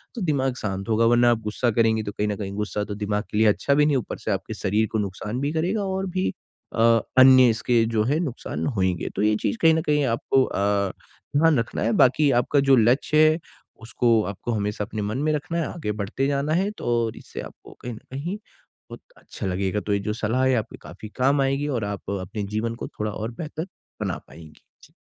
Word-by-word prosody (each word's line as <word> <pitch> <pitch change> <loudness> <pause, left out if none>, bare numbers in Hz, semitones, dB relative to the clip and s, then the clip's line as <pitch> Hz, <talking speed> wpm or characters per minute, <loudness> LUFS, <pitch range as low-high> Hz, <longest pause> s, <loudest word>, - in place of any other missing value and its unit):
तो 230 - -5
दिमाग 135 -6 0
शांत 100 0 -4
होगा 115 +1 +3
वरना 120 +1 +5
आप 115 - +1
गुस्सा 110 +3 -1
करेंगे, 110 0 +2
तो 105 - -4
कहीं 105 - -2
न 105 - -1
कहीं 100 -2 -5
गुस्सा 105 0 -2
तो 105 0 -5
दिमाग 105 0 -2
के 105 - -2
लिए 110 0 +5
अच्छा 140 +6 +2
भी 150 +1 +4
नहीं, 145 -3 +2
ऊपर 120 - -4
से - - -3
आपके - - -3
शरीर 105 +3 0
को 110 - 0
नुकसान 105 +4 -4
भी 145 +1 0
करेगा 185 +6 0
और 190 0 -2
भी 185 0 -1 0.4
अ, 115 - +1 0.4
अन्य 130 -1 +8
इसके 115 +1 +2
जो 110 -1 +2
है 145 +8 +1
नुकसान 140 -8 -4
होंगे। 95 -9 -1
तो - - -1
ये 105 0 +3
चीज़ - - -1
कहीं 165 -1 +6
न 160 - +1
कहीं 150 -2 +1
आपको 130 +2 +2
अ, - - -4 0.8
ध्यान 155 -3 +4
रखना 115 - -3
है 115 - +1
बाकी 135 +3 +4
आपका 140 +3 +1
जो 135 - +8
लक्ष्य 125 +6 +3
है 160 - -2 0.4
उसको 115 -1 +2
आपको 100 +4 -5
हमेशा 105 -1 -2
अपने 110 0 -5
मन 105 +4 -2
में 150 +3 0
रखना 160 +3 -3
है, 165 - 0
आगे 155 -11 -3
बढ़ते 105 +6 -2
जाना 140 +2 0
है 190 +5 +1
तो 115 -2 0
इससे - - -8
आपको - - -12
कहीं 125 - -5
न 110 - -9
कहीं 165 +10 -4
बहुत 210 - -17 0.2
अच्छा - - -8
लगेगा। 95 +2 -1
तो 105 - -2
ये 100 - +1
जो 105 +2 -3
सलाह 115 +4 0
है 130 - +3
आपके 110 -3 -3
काफ़ी 110 - -10
काम 135 +2 +2
आएगी 135 +2 0
और 120 -8 -1
आप 100 -1 -6
अपने 100 +3 -5
जीवन 115 +1 -1
को - - -6
थोड़ा 105 0 -1
और 110 +3 -5
बेहतर 160 +2 -5 0.3
बना - - -2
पाएँगी। 80 -1 -14 0.2
जी। - - -19
120 Hz, 225 wpm, -24 LUFS, 105-145 Hz, 0.8 s, अन्य